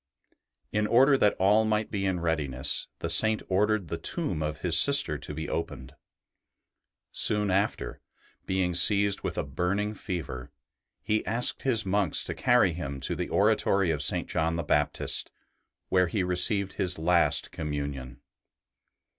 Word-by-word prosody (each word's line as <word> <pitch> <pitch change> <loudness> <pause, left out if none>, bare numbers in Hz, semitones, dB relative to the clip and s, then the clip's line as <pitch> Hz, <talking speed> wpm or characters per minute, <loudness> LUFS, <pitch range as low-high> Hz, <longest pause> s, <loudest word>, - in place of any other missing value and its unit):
In 105 0 0
order 135 +5 +4
that 105 -6 +2
all 105 +4 +3
might 110 -1 -1
be 100 -2 -2
in 90 -2 -2
readiness, 75 -5 -2
the - - -2
Saint 110 +6 +2
ordered 105 0 0
the - - -5
tomb 80 - -1
of 75 0 -4
his 85 -2 0
sister 140 - +2
to 75 - -6
be 80 +1 -5
opened. 70 -4 -5 1.2
Soon 105 -2 +5
after, 100 +3 -2 0.5
being 95 -1 -1
seized 100 +3 +3
with - - -5
a - - -1
burning 90 +9 -2
fever, 85 -12 -6 0.5
he 110 0 -1
asked 115 +4 0
his 115 -6 +1
monks 95 -3 +1
to - - -5
carry 120 -8 +2
him 70 -5 -6
to - - -2
the - - -4
oratory 95 -3 +1
of 75 -2 -3
St. - - +3
John 80 +1 -1
the 85 - -3
Baptist, 75 -1 -1 0.6
where 90 -1 +2
he 95 +3 -2
received 95 +2 +1
his 90 -1 0
last 85 +1 +1
Communion. 70 -4 -6
90 Hz, 150 wpm, -27 LUFS, 80-105 Hz, 1.2 s, Soon